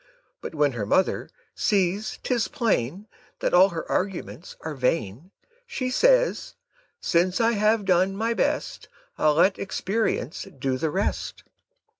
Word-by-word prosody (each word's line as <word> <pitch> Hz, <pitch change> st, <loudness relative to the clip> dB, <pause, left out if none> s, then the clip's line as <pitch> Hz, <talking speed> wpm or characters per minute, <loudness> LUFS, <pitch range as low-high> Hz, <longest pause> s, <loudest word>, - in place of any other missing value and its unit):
But -, -, -7 dB
when 145 Hz, -2 st, +2 dB
her 110 Hz, -5 st, -4 dB
mother 185 Hz, -, +1 dB, 0.2 s
sees 200 Hz, 0 st, 0 dB
'tis 245 Hz, -3 st, 0 dB
plain 195 Hz, -, -1 dB, 0.3 s
That -, -, -1 dB
all 185 Hz, +2 st, +7 dB
her 165 Hz, -3 st, -5 dB
arguments 185 Hz, -2 st, -3 dB
are 160 Hz, -, -5 dB
vain, 130 Hz, -, -2 dB, 0.4 s
Says -, -, +2 dB, 0.4 s
she, -, -, -64 dB
"Since 180 Hz, +2 st, +1 dB
I 230 Hz, 0 st, +3 dB
have 215 Hz, -1 st, +2 dB
done 185 Hz, +1 st, +2 dB
my 225 Hz, +2 st, 0 dB
best, -, -, -2 dB, 0.3 s
I'll 150 Hz, -1 st, +3 dB
let 185 Hz, +5 st, +3 dB
experience 195 Hz, -2 st, -2 dB
do 130 Hz, 0 st, -1 dB
the 160 Hz, -, 0 dB
rest." 190 Hz, +6 st, -2 dB
190 Hz, 135 wpm, -25 LUFS, 160-215 Hz, 0.4 s, all